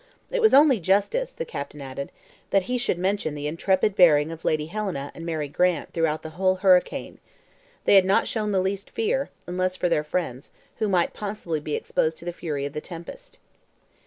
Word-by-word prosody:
"It - - 0
was 440 - +6
only 280 -4 +6
justice," 205 - +1
the 485 - -5
captain 145 +1 -7
added, 140 0 -6 0.4
"that 195 -1 +3
he 250 +5 -2
should 235 -7 0
mention 185 -4 -1
the 145 0 -5
intrepid 190 +6 +1
bearing 160 -5 +5
of 165 0 -9
Lady 155 -1 +1
Helena 175 -6 -4
and 165 - -9
Mary 155 -3 -2
Grant 175 +2 0
throughout 160 -2 0
the 160 - -7
whole 185 +2 +1
hurricane. 185 -1 +2 0.7
They - - +5
had 195 -1 +8
not 190 - +3
shown 215 -2 -1
the 190 -2 +2
least 195 +1 -3
fear, 455 +3 -1 0.2
unless 185 +1 -1
for 180 -1 0
their 160 -3 +2
friends, 150 -5 -3 0.3
who 215 - 0
might 180 -3 +2
possibly 200 -6 -4
be 150 0 -3
exposed 160 0 -1
to - - -13
the 175 - -3
fury 150 -5 -3
of 140 - -5
the 150 - -4
tempest." 470 - -10
180 Hz, 195 wpm, -25 LUFS, 155-200 Hz, 0.7 s, had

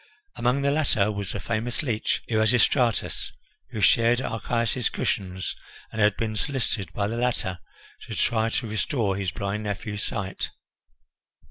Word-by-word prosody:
Among 125 +3 +1
the 140 - +3
latter 130 -9 +2
was 100 -2 -3
the 105 - -3
famous 115 - -2
leech 115 -6 0
Erasistratus, 115 +2 +2 0.4
who 110 - -4
shared 115 +4 +5
Archias's 115 0 0
cushions, 95 -2 -2 0.4
and 110 - -2
had 105 -1 +4
been 110 -1 -1
solicited 115 -5 -1
by 100 -1 0
the 115 +2 -3
latter 120 -7 0 0.5
to - - -5
try 115 -1 +2
to 115 +1 -1
restore 110 -1 0
his 95 -1 -1
blind 100 +3 -2
nephew's 105 0 -3
sight. 95 -2 -2
110 Hz, 140 wpm, -26 LUFS, 100-120 Hz, 0.5 s, shared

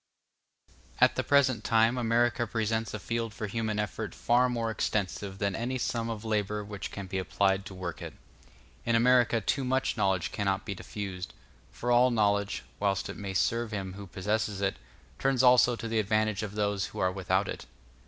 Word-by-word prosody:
At - - +6
the - - 0
present 130 -6 +3
time 115 +1 +3
America 120 0 +1
presents 110 0 -1
a - - -2
field 115 +1 -3
for 105 - -4
human 110 0 -2
effort 105 -4 -3
far 125 +1 +3
more 115 -2 -1
extensive 100 -2 -2
than 100 -1 -1
any 125 +3 -2
sum 115 -1 -2
of 115 -1 -5
labor 105 -1 -1
which 100 -1 -6
can 100 - -6
be 95 +1 -3
applied 95 +2 +1
to 95 - -9
work 90 -2 -5
it. - - -7 0.7
In 115 - +1
America 120 -1 +4
too 135 - 0
much 130 -1 0
knowledge 95 -4 +1
cannot 95 -1 -1
be 100 - -3
diffused; 95 -1 -6 0.3
for 120 - -3
all 120 +1 +6
knowledge, 100 -3 +1 0.2
whilst 100 -1 0
it - - -5
may 95 -2 -5
serve 115 +5 +1
him 95 -3 -4
who 100 0 -9
possesses 105 +2 -1
it, 100 -1 0 0.4
turns 135 -2 +2
also 125 -1 +6
to 115 - -6
the 115 -1 0
advantage 110 0 +1
of 105 -1 -5
those 100 -3 0
who - - -11
are 95 0 +2
without 95 +1 0
it. - - -6
105 Hz, 185 wpm, -29 LUFS, 100-115 Hz, 0.7 s, At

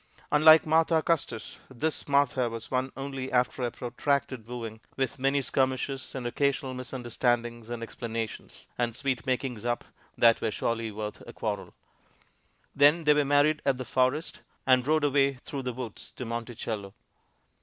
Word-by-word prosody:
Unlike 155 +2 +8
Martha 160 0 +3
Custis, 140 -9 -1
this 150 +5 -2
Martha 140 -3 +2
was 115 0 -7
won 130 0 0
only 135 -1 -4
after 125 +1 +1
a 120 - +1
protracted 125 0 -2
wooing, 115 -2 -6 0.2
with 135 0 -1
many 135 +1 +2
skirmishes 130 +1 -1
and 130 -2 -4
occasional 135 +1 0
misunderstandings 120 -2 -2
and 120 -1 -4
explanations, 115 -1 -5
and 120 -2 0
sweet 130 -1 -2
makings 125 -3 -1
up 120 0 -1 0.3
that 115 -1 +5
were 110 - +1
surely 115 +1 -1
worth 105 0 -6
a - - -9
quarrel. - - -4 1.0
Then 145 +4 +5
they 150 -1 +6
were 150 0 +3
married 145 +2 +3
at 135 -2 +2
"The 130 - -5
Forest," 130 +6 0 0.2
and 130 0 +4
rode 155 0 +3
away 140 -1 +3
through 135 +2 -6
the 125 -1 -3
woods 120 -3 -7
to 125 - -6
Monticello. 115 -3 -5
130 Hz, 155 wpm, -28 LUFS, 120-140 Hz, 1.0 s, Unlike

